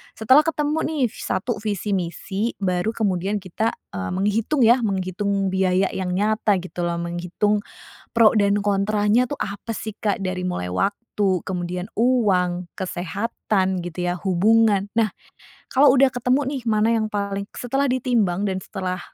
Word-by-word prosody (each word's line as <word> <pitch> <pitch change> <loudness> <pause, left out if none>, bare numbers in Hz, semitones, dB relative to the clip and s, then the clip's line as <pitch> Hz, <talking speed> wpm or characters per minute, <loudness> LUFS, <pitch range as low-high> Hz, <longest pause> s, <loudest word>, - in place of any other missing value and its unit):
Setelah 260 +7 +5
ketemu, 300 0 0
nih, 310 -3 -2
ves - - -10
satu 230 +4 -1
visi 210 -1 -3
misi 190 +5 -3
baru 185 +2 0
kemudian 200 -1 0
kita, 200 +4 -2 0.2
eee, 95 -1 -3
menghitung, 210 +8 +1
ya, 245 +2 +6
menghitung 195 0 -1
biaya 190 0 +2
yang 185 -1 -2
nyata, 210 +1 +1
gitu, 180 -1 -6
loh, 170 0 -1
menghitung 180 +5 -1 0.5
pro 230 -2 +6
dan 200 0 +3
kontranya, 210 +4 +2
tuh, 290 - -4
apa, 205 +3 -4
sih, 220 - -5
Kak. 205 -2 -1
Dari 185 -1 -2
mulai 90 - -3
waktu, 195 - 0 0.5
kemudian 180 0 -4
uang, 185 -8 +2
kesehatan, 190 0 -2
gitu, 175 +1 -4
ya, 175 - 0
hubungan. 205 +2 +3
Nah, 220 -3 +3 0.6
kalau 275 +1 +6
udah 270 0 +5
ketemu, 250 +2 +1 0.2
nih, 250 - -10
mana 215 +1 +3
yang 220 -1 0
paling 200 -1 -2
setelah 270 +3 0
ditimbang 230 -7 +1
dan 190 - -2
setelah, 185 -2 -4
200 Hz, 150 wpm, -22 LUFS, 185-225 Hz, 0.6 s, ya